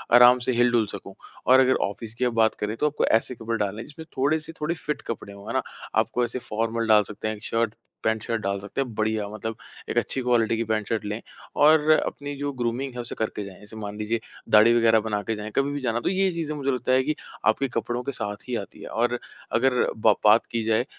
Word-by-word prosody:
आराम 125 +1 +8
से - - +2
हिल-डुल 120 -2 +3
सकूँ। - - -9 0.3
और 130 +1 +7
अगर 130 0 +4
ऑफ़िस 110 +2 -8
की 125 +2 -1
अब 120 - 0
बात 110 -1 +3
करें, 105 +1 -2
तो 150 - 0
आपको 150 - 0
ऐसे 115 +3 +2
कपड़े 115 0 -3
डालने 105 0 -2
हैं, - - -8
जिसमें 160 +2 -10
थोड़े-से 155 +4 0
थोड़ी 170 +3 0
फ़िट 150 -2 -2
कपड़े 100 -3 -5
हों, 100 0 -12
है - - -3
ना। - - +2 0.3
आप - - +3
कोई 125 - +2
ऐसे 120 +2 -4
फ़ॉर्मल 115 0 -2
डाल 105 -1 +6
सकते 105 +1 -6
हैं, 110 - -2
एक 105 - -15
शर्ट, 115 -1 0 0.3
पैंट-शर्ट 110 0 0
डाल 100 0 -1
सकते 105 +7 -4
हैं 125 -4 -4
बढ़िया 110 -1 0
मतलब 110 +1 -5 0.3
एक - - -2
अच्छी 135 - 0
क्वालिटी 115 -2 +2
की 115 - 0
पैंट-शर्ट 110 0 -1
लें 105 +2 -3 0.4
और 155 0 +6
अपनी 145 -2 0
जो 145 +1 -3
ग्रूमिंग 120 +3 -1
है, 125 - -7
उसे 120 - -6
करते 110 -1 -3
जाएँ। 95 -2 -11
जैसे 105 +1 -12
मान 105 -1 -6
लीजिए, 110 +2 -1 0.3
दाढ़ी 110 +2 +7
वग़ैरह 115 -1 +5
बना 105 -1 0
के 110 - -2
जाएँ, 105 +1 -6
कभी 140 +1 +2
भी 145 - -3
जाना। 120 -2 0
तो - - -1
ये 190 0 +2
चीज़ें 160 -3 -3
मुझे 140 -1 -1
लगता 125 0 -1
है 130 0 +4
कि 155 +3 -1 0.3
आपके 135 +5 +3
कपड़ों 120 0 -2
के 140 - -3
साथ 105 -1 -5
ही 125 - -2
आती 100 - -6
है। - - -7
और 120 +1 0 0.3
अगर 125 +2 +2 0.2
ब 110 -1 +4
बात 105 +2 +6
की 115 -1 -1
जाए, 110 +3 +2
115 Hz, 245 wpm, -25 LUFS, 110-130 Hz, 0.4 s, आराम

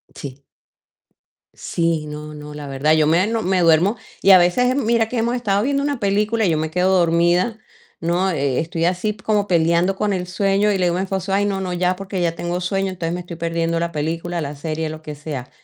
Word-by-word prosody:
Sí. 140 -1 -9 1.1
Sí, 165 -2 -1
no, 150 0 -7
no, 150 0 -9
la 150 -1 -7
verdad 140 +3 +1
yo 155 -1 +3
me 170 +5 +3 0.2
me 185 0 +1
duermo 170 +6 +4 0.2
y 195 - +5
a 185 - +10
veces 215 +9 +3
mira 230 -4 +1
que 250 - -3
hemos 235 +2 0
estado 205 -5 0
viendo 280 +2 0
una 285 -3 -1
película 210 +2 +1
y - - +2
yo 160 - +1
me 155 0 -2
quedo 185 +2 +2
dormida, 175 +5 +2 0.4
¿no? 175 +3 0
Eh, 140 -6 0
estoy 165 +1 -2
así 185 +4 0
como 205 0 0
peleando 170 +2 +2
con 210 0 0
el 180 -1 -3
sueño 195 +3 +1
y 200 - +1
le 185 - +1
digo 175 0 +1
a - - -1
mi 190 - 0
esposo: 190 0 -3
"Ay, 200 +1 +2
no, 200 -1 -1
no, 185 -2 -3
ya, 180 +1 0
porque 195 -1 -4
ya 170 -1 0
tengo 175 +1 -3
sueño, 195 +1 -1
entonces 170 -3 -3
me 175 - -3
estoy 175 -1 -8
perdiendo 165 0 -1
la 170 - -2
película, 165 +3 -3
la 145 -2 -4
serie, 155 +2 -3
lo 155 0 -7
que 155 -1 -7
sea". 145 -4 -7
175 Hz, 225 wpm, -20 LUFS, 160-195 Hz, 1.1 s, a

